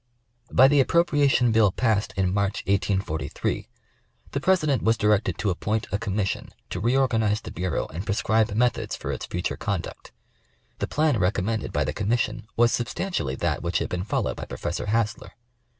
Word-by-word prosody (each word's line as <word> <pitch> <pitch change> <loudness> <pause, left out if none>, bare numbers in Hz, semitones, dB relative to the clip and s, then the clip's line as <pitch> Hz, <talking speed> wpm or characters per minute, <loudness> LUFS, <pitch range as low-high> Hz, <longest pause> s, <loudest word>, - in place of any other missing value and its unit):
By 130 - +7
the 145 +1 +4
appropriation 140 -5 +3
bill 110 -3 +4
passed 110 0 +1
in 95 -1 +1
March, 100 0 0
184 95 -4 0 0.2
3, - - -2 0.6
the 140 - -1
President 155 - +2
was 115 +1 +2
directed 105 0 +2
to 105 - 0
appoint 110 +4 -1
a 100 - 0
Commission 100 -2 -2 0.2
to 85 - -3
reorganize 115 -2 +2
the - - -8
Bureau 90 -1 -2
and 85 +4 -4
prescribe 110 +1 +1
methods 120 +1 +1
for - - -5
its - - -5
future 90 +1 -3
conduct. 100 -6 -4 0.7
The - - -1
plan 150 -4 +2
recom 95 0 +1
mended 110 +2 -2
by 75 - +1
the 75 +2 -2
Commission 110 +2 -1
was 120 0 +5
substantially 120 - -2
that - - -1
which 85 0 0
had - - -2
been 90 0 -2
followed 105 - -1
by - - -5
Professor 85 +4 -4
Hassler. 110 0 -1
105 Hz, 170 wpm, -25 LUFS, 95-120 Hz, 0.7 s, By